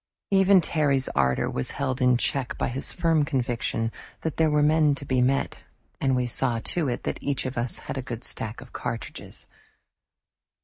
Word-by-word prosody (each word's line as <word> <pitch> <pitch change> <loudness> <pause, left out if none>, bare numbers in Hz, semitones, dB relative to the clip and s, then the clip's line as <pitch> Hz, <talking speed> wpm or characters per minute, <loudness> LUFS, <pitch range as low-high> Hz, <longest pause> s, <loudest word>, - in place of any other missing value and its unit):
Even 195 -1 +6
Terry's 140 -5 +1
ardor 65 0 +1
was 65 - -3
held 130 -1 -1
in 125 -1 +5
check 130 0 0
by - - 0
his 130 +3 -3
firm 165 -4 +2
conviction 120 -5 -1 0.3
that 160 -3 -3
there 160 -1 +4
were 150 0 +3
men 150 -1 +4
to 140 - -6
be 130 -1 +1
met, 135 +2 +1 0.4
and 135 -1 +2
we 125 -1 +1
saw 120 0 +1
to 155 +7 -1
it 120 - -3
that - - -3
each 140 -1 -1
of 130 0 -3
us 120 0 -2
had 135 - -3
a - - -2
good 120 -2 -6
stock 110 +2 -5
of 125 - -14
cartridges. 115 - -6
135 Hz, 185 wpm, -26 LUFS, 120-150 Hz, 0.4 s, Even